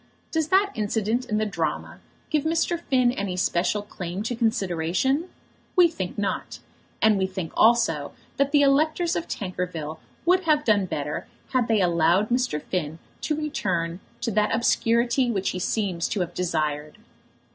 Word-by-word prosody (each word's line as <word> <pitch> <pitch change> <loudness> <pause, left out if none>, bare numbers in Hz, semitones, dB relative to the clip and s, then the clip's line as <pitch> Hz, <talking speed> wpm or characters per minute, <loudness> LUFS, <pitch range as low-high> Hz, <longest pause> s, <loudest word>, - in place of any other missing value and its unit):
Does 320 -2 0
that 390 +4 +3
incident 220 +3 -1
in 215 - +1
the 215 - +1
drama 210 - -3 0.3
give 305 -3 +2
Mr. 330 +1 +1
Finn 255 -6 +2
any 200 -7 -3
special 185 +3 +1
claim 185 -1 -5
to 240 +2 -2
consideration? 225 - 0 0.5
We 355 -3 +6
think 190 - -5
not; 205 -1 -2 0.5
and 215 -2 +5
we 190 - +1
think 185 -3 -5
also 215 -11 +3 0.3
that 280 0 +2
the 290 -1 +5
electors 310 +5 +2
of 330 - -2
Tankerville 180 -5 -4 0.3
would 365 +1 +3
have 300 -2 +3
done 205 -4 +3
better 150 -3 -4 0.3
had 250 -3 +2
they 220 -3 +3
allowed 175 +3 +3
Mr. 245 -9 +1
Finn 160 -1 -3 0.2
to 305 - 0
return 185 - -2 0.2
to 235 -1 -1
that 210 +1 +2
obscurity 235 +2 +2
which 195 -4 0
he 185 - -4
seems 185 -3 -1
to 205 - -2
have 175 -1 -3
desired. 150 -4 -2
215 Hz, 155 wpm, -25 LUFS, 180-265 Hz, 0.5 s, We